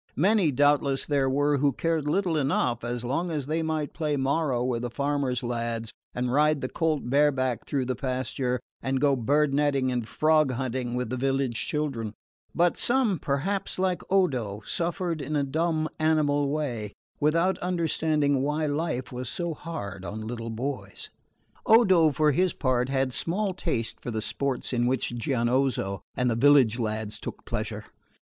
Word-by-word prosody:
Many, 195 +1 +3
doubtless, 145 0 +2
there 140 -2 +1
were 145 +2 +2
who 140 0 +2
cared 160 +1 -1
little 175 +1 +1
enough, 135 -5 0
as 120 0 -3
long 155 +8 -1
as 150 -5 -2
they 160 +3 -1
might 155 -2 -2
play 150 -3 -1
morro 135 -2 +1
with 125 -2 -1
the 120 - -3
farmer's 140 -1 -1
lads 115 -2 -3 0.2
and 125 0 -1
ride 150 +1 +3
the 130 - -2
colt 160 -5 -1
bare 145 +3 +4
back 130 -3 -2
through 135 -3 0
the 130 0 -1
pasture 130 0 -2 0.2
and 130 0 0
go 140 0 +3
bird 140 +4 +2
netting 140 -2 +2
and 120 -3 -2
frog 155 +1 +3
hunting 125 -1 -2
with 125 -2 -2
the 130 - -1
village 135 -2 0
children; 125 -8 -2 0.4
but 175 0 +3
some 240 - +1
perhaps, 160 +9 -1
like 185 -1 0
Odo, 125 - +1
suffered 170 -2 -2
in 145 +3 -3
a 145 - +2
dumb 155 +3 0
animal 150 -3 +2
way, 125 -9 -3 0.3
without 165 +5 +2
understanding 155 -5 +1
why 150 +3 0
life 145 -4 -2
was 125 -1 -4
so 170 -2 -2
hard 100 - -6
on 110 +4 -5
little 115 0 -5
boys. 130 +5 -5 0.6
Odo, 190 -9 +6
for 150 +2 +3
his 180 +5 +2
part, 130 -2 0
had 135 -1 0
small 190 - 0
taste 115 -10 -2
for - - -5
the 110 -2 -2
sports 135 +4 -2
in 120 0 +2
which 125 -1 0
Gianozzo 120 -4 0 0.2
and 125 - +1
the 120 - +1
village 130 -2 +5
lads 110 -1 -3
took - - -8
pleasure. - - -4
140 Hz, 165 wpm, -27 LUFS, 125-155 Hz, 0.6 s, Odo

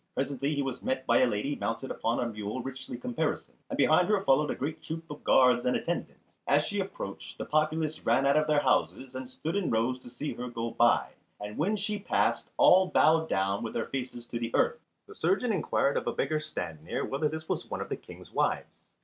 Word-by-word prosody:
Presently 140 +2 -1
he 140 - 0
was 135 -2 -4
met 130 0 -2
by 120 - +4
a 130 - +5
lady 120 +6 -1
mounted 115 +3 -3
upon 115 +1 -1
a - - 0
mule 105 +2 -4
richly 135 -2 -6
caparisoned, 125 0 -3
and - - -3
behind 175 +5 +4
her 205 -2 +2
followed 145 +1 +3
a - - -1
great 155 +4 -4
troop 160 +1 -5
of 150 - -9
guards 125 -2 +5
and 125 - +2
attendants. - - -5
As - - +4
she - - -2
approached - - -6
the - - -4
populace 155 0 0
ran 120 +4 +3
out 140 - +4
of 155 0 +3
their 150 -1 +3
houses 130 -2 +1
and 130 -1 -6
stood 160 +6 -4
in 200 -3 0
rows 115 +3 +1
to 125 - -12
see 135 +5 -4
her 125 - -5
go 115 -1 -3
by, 120 0 +3 0.3
and 105 +1 -6
when 195 +8 +1
she 210 +1 -2
passed 200 - 0
all 185 +1 +7
bowed 160 -1 +4
down 95 +1 +1
with 115 - -5
their 115 - 0
faces 125 -3 -5
to 120 - -3
the 115 -1 -2
earth. 470 0 +2 0.3
The 420 - -12
surgeon 250 - +1
inquired 150 -5 +1
of - - -2
a - - 0
beggar 155 +3 0
stand 80 - -6
near 80 - -2
whether 145 +3 0
this 160 +1 -6
was - - -3
one - - -3
of - - -5
the - - -1
King's - - -13
wives. - - 0
135 Hz, 225 wpm, -29 LUFS, 120-155 Hz, 0.3 s, all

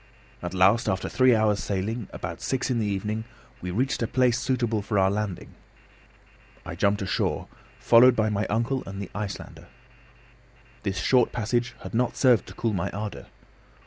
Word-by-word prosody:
At 90 +1 -5
last, 100 +5 +4
after 95 - -1
three 130 -2 +4
hours' 110 -2 +2
sailing, 100 +5 -3
about - - -6
six 130 0 -1
in 120 - +1
the 105 - 0
evening 105 +2 -2 0.4
we 90 - -4
reached 125 +10 -1
a 115 - +1
place 125 0 +2
suitable 120 -5 0
for 105 +1 -2
our 95 0 +4
landing. 105 -3 -4 1.1
I - - -6
jumped 100 +4 +1
ashore, 95 - -1 0.3
followed 125 +2 +6
by 110 -1 +1
my 105 +1 -1
uncle 120 +5 0
and 95 0 -6
the 100 - -6
Icelander. 105 -1 -6 1.1
This 95 -2 -3
short 125 +8 +3
passage 120 +2 -1
had - - -8
not 120 +1 0
served 125 -5 +4
to - - -11
cool 115 -2 -1
my 90 -4 -1
ardour. 105 +1 -6
110 Hz, 170 wpm, -26 LUFS, 100-120 Hz, 1.1 s, followed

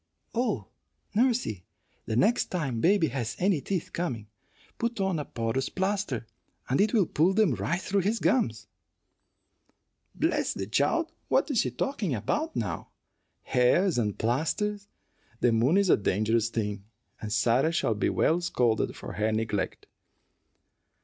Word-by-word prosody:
"Oh, 220 - 0 0.5
nursey, 230 - +1 0.4
the 110 - -1
next 210 - +3
time 135 -10 -2
baby 185 -2 +4
has 115 -4 -3
any 185 -5 +2
teeth 185 0 -3
coming, 125 -12 -3 0.5
put 235 -1 -2
on 190 -4 0
a 145 - -4
porous 115 +3 -2
plaster, 190 - -1 0.4
and 130 - +2
it 210 +1 +3
will 210 -6 +3
pull 170 +5 +2
them 210 -9 +4
right 115 - -1
through 195 +1 0
his 210 +5 0
gums." 115 - +1 1.5
"Bless - - 0
the 95 - -3
child! 145 - +1 0.2
What - - +2
is 245 - +2
she 125 - +2
talking 180 - -2
about 310 - -2
now? - - -3 0.5
Hares 135 +6 +3
and 105 -3 -1
plasters! 200 - -1 0.5
The 120 - +3
moon 120 +10 +3
is 200 -3 +4
a - - +6
dangerous 110 +3 +1
thing, 105 -3 -3 0.4
and 105 - -5
Sarah 120 +8 +3
shall 160 -8 +1
be 105 - 0
well 165 +3 +2
scolded 120 -10 +1
for - - -8
her 110 +1 0
neglect." 110 -2 -2
145 Hz, 145 wpm, -28 LUFS, -, 1.5 s, a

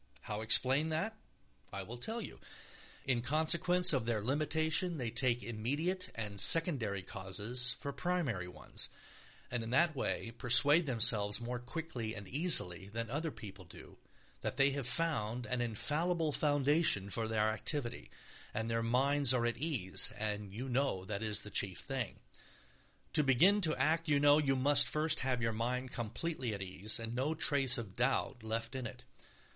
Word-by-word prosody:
How 105 0 -6
explain 130 +7 +3
that? 165 +8 -2 0.6
I 100 -1 -6
will 120 +5 -9
tell 225 - -3
you: - - -10 0.7
in 125 -3 +1
consequence 170 +6 +3
of 125 -5 -1
their 110 -3 -1
limitation 155 - 0
they 120 -4 -4
take 120 0 0
immediate 145 - -2
and 105 -3 -4
secondary 125 - +3
causes 105 +7 -3
for 140 +2 -4
primary 140 - -2
ones, 90 - -1 0.6
and 120 -1 -2
in 115 - -6
that 155 +5 +2
way 120 -3 -3
persuade 140 +7 +7
themselves 105 -4 +3
more 120 +1 -5
quickly 125 -4 -6
and 100 -1 -9
easily 100 - 0
than 115 +2 -5
other 155 +4 -2
people 100 -8 -11
do 85 - -14 0.4
that - - -4
they 140 0 +4
have 135 -3 -4
found 125 -6 -2
an 125 -1 -2
infallible 155 +8 -1
foundation 145 - +2
for 115 +1 0
their 110 -1 0
activity, 120 +3 -3 0.5
and 115 +1 -2
their 115 0 0
minds 130 +3 +3
are 120 -1 0
at 120 - -1
ease 125 - 0
and 105 -1 -3
you 120 +7 -6
know 125 -7 -1
that 100 +1 -5
is 105 -2 -2
the 105 - -10
chief 95 -1 +1
thing. 135 -6 -4 1.0
To - - +5
begin 180 +11 +4
to 160 -4 +2
act, 155 +5 0
you 145 -1 +3
know, 145 +1 +5
you 135 -3 +1
must 140 +2 +5
first 155 +1 +1
have 130 -2 -2
your 115 -1 0
mind 125 +3 -3
completely 120 +1 -4
at 100 - -6
ease 95 +4 -2
and 115 0 -5
no 135 +6 -2
trace 140 -5 +2
of 110 -5 -8
doubt 125 0 -1
left 115 +2 -4
in 130 -3 -4
it. 125 +3 -12
125 Hz, 165 wpm, -33 LUFS, 110-150 Hz, 1.0 s, persuade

